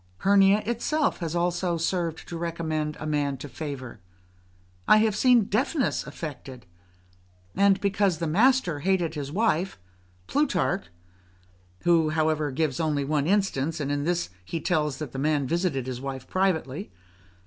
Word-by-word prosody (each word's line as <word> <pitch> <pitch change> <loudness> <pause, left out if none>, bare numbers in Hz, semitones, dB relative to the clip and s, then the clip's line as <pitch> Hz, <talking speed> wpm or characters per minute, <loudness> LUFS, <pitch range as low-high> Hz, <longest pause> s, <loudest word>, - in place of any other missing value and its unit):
Hernia 200 - +4
itself 260 +7 0
has 165 -2 -3
also 175 0 0
served 165 -1 -2
to 170 - -6
recommend 160 -2 -3
a - - -5
man 145 -2 0
to 135 - -8
favour; 130 -4 -7 0.9
I - - +7
have 215 -1 +2
seen 245 0 +5
deafness 255 +8 0
affected; 135 -5 -8 0.9
and 200 -1 +4
because 200 -3 +1
the 165 - -2
master 195 - +3
hated 175 -1 +1
his 145 -3 -5
wife, 190 - 0 0.5
Plutarch 185 - 0 1.0
[who, 165 -2 +3
however, 155 -1 +1
only 135 - -6
gives 150 -4 0
one 150 -1 0
instance; 165 -6 0
and 145 -1 -2
in 145 0 -1
this 175 - -1
he 165 - -4
tells 150 -4 0
us - - -13
that 150 -5 -5
the 135 - -5
man 145 -1 +1
visited 165 -4 -1
his 130 -1 -5
wife 135 -1 -6
privately. 185 -3 -1
165 Hz, 150 wpm, -26 LUFS, 145-195 Hz, 1.0 s, I